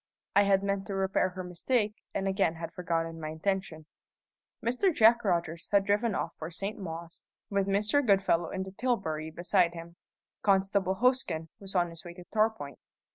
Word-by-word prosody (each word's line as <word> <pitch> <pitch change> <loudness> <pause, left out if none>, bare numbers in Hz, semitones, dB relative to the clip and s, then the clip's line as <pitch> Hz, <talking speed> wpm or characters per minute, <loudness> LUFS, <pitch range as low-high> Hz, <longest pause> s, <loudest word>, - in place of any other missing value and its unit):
I 200 0 +6
had 195 0 +3
meant 200 -1 -1
to 195 - -3
repair 190 -1 +1
her 185 0 -6
mistake, 210 +5 0 0.2
and 195 - -2
again 190 -4 +1
had 165 0 -6
forgotten 165 -2 -2
my 155 - -4
intention. 160 -1 -2 0.8
Mr. 250 +11 +2
Jack 235 -4 +5
Rogers 170 -4 -1
had 200 -1 +4
driven 205 +1 +1
off 170 - -2
for 160 - -5
St. 195 +5 -5
Mawes, 170 -2 -8 0.2
with 200 -1 +1
Mr. 210 +8 +2
Goodfellow 190 -6 +3
in 190 - -3
the 190 - -8
tilbury 190 -9 -1
beside 175 +1 +1
him. 170 +1 -9 0.4
Constable 195 -1 +2
Hosken 190 -9 +1
was 195 -1 -9
on 175 -1 +2
his 165 - -9
way 175 -1 -9
to 180 - -10
Torpoint. 215 - 0
190 Hz, 175 wpm, -30 LUFS, 170-200 Hz, 0.8 s, I